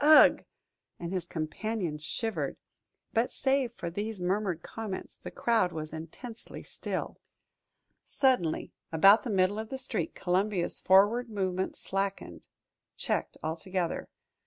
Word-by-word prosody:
Ugh!" 305 +1 +8 0.6
and 170 +1 -4
his 185 -2 -2
companion 165 +1 -2
shivered. 160 - -2 0.6
But 230 +2 +2
save 265 -2 +1
for 170 -8 -5
these 205 +3 -3
murmured 180 -2 0
comments, 215 -4 -5
the - - -8
crowd 225 -6 +2
was 155 -1 -5
intensely 195 +9 -8
still. - - -4 0.8
Suddenly, 250 - +1 0.2
about 195 +7 +7
the 245 - -5
middle 195 +1 +2
of 220 0 -5
the 265 - -3
street, 220 -10 -3
Columbia's 185 0 0
forward 210 +6 +5
movement 190 -3 -1
slackened, 195 - -3 0.5
checked - - -1
altogether. 170 +2 -2
195 Hz, 120 wpm, -30 LUFS, 170-225 Hz, 0.8 s, Ugh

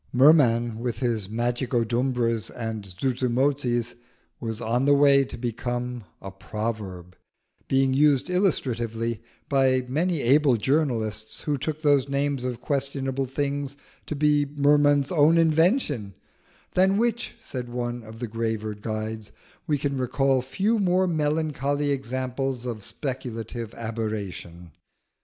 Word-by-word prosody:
Merman 120 -5 +4
with 120 -1 -2
his 115 -6 0
Magicodumbras 120 0 0
and 110 -3 -5
Zuzumotzis 125 +3 0 0.5
was 115 -1 -4
on 120 +3 0
the 145 0 +5
way 140 -1 +6
to - - -7
become 120 0 -3
a 95 - -8
proverb, 95 -3 -5 0.5
being 135 0 +2
used 140 -1 +3
illustratively 115 - 0 0.3
by 130 -2 +2
many 160 +4 0
able 135 +1 +4
journalists 110 -5 -1
who 150 - -1
took 155 +3 -4
those 140 -2 +3
names 140 -1 0
of 125 -2 -4
questionable 135 -1 -1
things 140 +1 -3 0.3
to 150 - -3
be 145 0 +3
Merman's 145 0 +3
own 160 0 +5
invention, 160 - +2 0.6
"than 190 +2 +4
which," 235 +1 -1
said 125 -2 -6
one 120 0 -3
of 110 0 -11
the 120 +1 -4
graver 110 -1 -2
guides, 110 0 -5 0.4
"we 150 -2 +2
can 140 0 -2
recall 130 +1 +1
few 200 - 0
more 185 -1 +3
melancholy 150 -3 0
examples 130 -1 -2
of 115 -3 -4
speculative 120 -4 -5
aberration." 105 -7 -5
130 Hz, 120 wpm, -25 LUFS, 115-145 Hz, 0.6 s, way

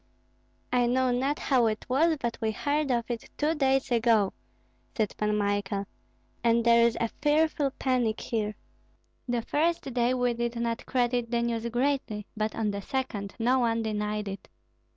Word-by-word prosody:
'" - - -19
"I 245 -1 +3
know 255 +1 +2
not 270 +4 0
how 250 -4 +2
it 215 0 -2
was, 315 +5 +3
but 235 -2 -2
we 220 - +1
heard 290 +6 -1
of 235 -2 +1
it 230 -2 -5
two 300 +2 +1
days 270 -3 +1
ago," 225 -4 +3 0.6
said 215 -3 0
Pan 210 0 0
Michael, 205 0 -1 0.6
"and 235 0 +3
there 235 0 +6
is 235 - -2
a 230 - -1
fearful 295 -1 +2
panic 245 -4 +1
here. 215 -3 -2 0.7
The 240 -2 -1
first 310 -2 0
day 245 +1 +2
we 245 -1 +1
did 235 0 -2
not 235 0 -2
credit 245 -2 0
the 235 0 0
news 235 0 -1
greatly, 245 -4 -1
but 215 0 -2
on 215 -2 0
the 200 0 -4
second 210 -5 -3
no 250 +3 +2
one 230 -2 +1
denied 210 -1 -2
it. 195 0 -7
235 Hz, 170 wpm, -28 LUFS, 220-260 Hz, 0.7 s, there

